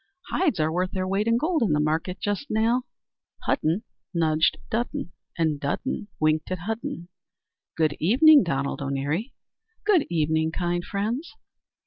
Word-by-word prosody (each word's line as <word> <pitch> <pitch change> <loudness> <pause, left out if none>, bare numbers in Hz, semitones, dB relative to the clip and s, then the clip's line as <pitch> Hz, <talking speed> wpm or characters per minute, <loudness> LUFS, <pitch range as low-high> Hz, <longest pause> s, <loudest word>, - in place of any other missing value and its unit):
Hides 315 - +1
are 155 +1 +2
worth 180 +2 -1
their 185 -1 -1
weight 195 +3 0
in 230 0 +4
gold 315 +4 +1
in 205 -10 +2
the 150 - +2
market 160 +5 -1
just 205 +7 -2
now." 230 +4 +2 0.6
Hudden 165 +8 +1 0.3
nudged 160 -1 +2
Dudden, 230 -5 -2 0.3
and 160 -3 +1
Dudden 145 +8 -2
winked 155 0 +1
at 185 - -1
Hudden. 215 -6 -4 0.7
"Good 155 -3 +1
evening, 285 - +7
Donald 140 -5 -2
O'Neary." 140 - -2 0.5
"Good 390 -8 +4
evening, 160 -1 +1
kind 175 0 -1
friends." 220 - -3
180 Hz, 140 wpm, -25 LUFS, 155-225 Hz, 0.7 s, evening